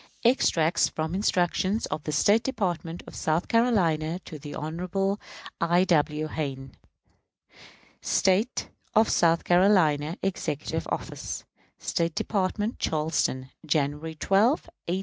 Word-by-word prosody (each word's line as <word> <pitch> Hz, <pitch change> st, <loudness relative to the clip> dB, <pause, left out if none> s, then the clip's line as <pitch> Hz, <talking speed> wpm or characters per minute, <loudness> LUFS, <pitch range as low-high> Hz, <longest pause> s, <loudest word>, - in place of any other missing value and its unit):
Extracts 170 Hz, -9 st, +3 dB
from 160 Hz, +1 st, -3 dB
instructions 190 Hz, +2 st, +1 dB
of 155 Hz, -, -5 dB
the 150 Hz, -, -2 dB
State 205 Hz, +9 st, +4 dB
Department 175 Hz, -, -3 dB
of -, -, -11 dB
South 160 Hz, +2 st, 0 dB
Carolina 175 Hz, -9 st, +2 dB
to 155 Hz, -, -8 dB
Hon. 185 Hz, +6 st, -2 dB, 0.4 s
I. 170 Hz, +2 st, +4 dB
W. 155 Hz, -3 st, +1 dB
Hayne. 135 Hz, -4 st, -4 dB, 1.3 s
State 200 Hz, +6 st, +1 dB, 0.3 s
of 220 Hz, +1 st, +5 dB
South 170 Hz, -1 st, +3 dB
Carolina, 175 Hz, -4 st, +3 dB
Executive 155 Hz, -6 st, -2 dB
Office, -, -, -4 dB, 0.3 s
State 165 Hz, -1 st, -1 dB
Department, 205 Hz, +2 st, -1 dB
Charleston, 150 Hz, -4 st, -1 dB
January 150 Hz, +1 st, -1 dB
12, 195 Hz, +8 st, +3 dB, 0.4 s
1861. 180 Hz, +2 st, 0 dB
170 Hz, 110 wpm, -27 LUFS, 155-195 Hz, 1.3 s, of